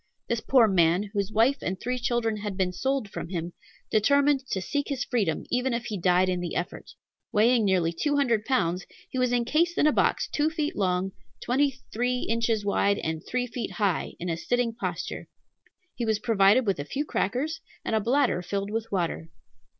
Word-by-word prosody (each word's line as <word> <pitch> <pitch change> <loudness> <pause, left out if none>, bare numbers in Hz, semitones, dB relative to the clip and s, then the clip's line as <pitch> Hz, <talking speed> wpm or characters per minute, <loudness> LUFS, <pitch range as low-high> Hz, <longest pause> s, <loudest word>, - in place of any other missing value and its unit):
This 235 -1 -1
poor 250 -4 +5
man, 185 +1 +2
whose 200 -1 -1
wife 235 +6 +3
and 185 0 -3
three 250 +1 -2
children 235 -2 0
had 205 -2 -5
been 185 -2 0
sold 265 +3 -1
from 180 - -6
him, 170 -1 -4 0.4
determined 280 +5 +3
to 190 - -1
seek 285 +9 -2
his 270 -3 -2
freedom, 200 - -1
even 250 0 +1
if 235 0 -4
he 215 - -3
died 180 +1 +3
in 180 -1 0
the 175 -1 -4
effort. 175 - -5 0.4
Weighing 225 +1 +4
nearly 180 -4 +2
two 290 - 0
hundred 235 -7 +2
pounds, 185 -8 0 0.3
he 260 - -2
was 250 -1 +2
encased 305 +9 +1
in - - +4
a 305 - +6
box - - +1
two 300 +1 +1
feet 315 -2 -2
long, 185 -1 0 0.3
twenty 265 +1 +1
three 245 +2 0
inches 225 -2 0
wide, 200 0 +2
and 160 0 -3
three 250 0 -1
feet 240 0 -5
high, 200 -6 0
in 175 - -4
a 165 -2 -1
sitting 245 +5 0
posture. 225 - -4 0.7
He 240 - -4
was 220 -1 +2
provided 215 +2 +4
with 195 -7 0
a - - -2
few 285 - -3
crackers, 295 +9 -1 0.2
and - - 0
a - - +3
bladder 235 -4 +2
filled 200 +3 -3
with 225 +1 -3
water. 170 -3 -2
220 Hz, 195 wpm, -27 LUFS, 190-250 Hz, 0.7 s, a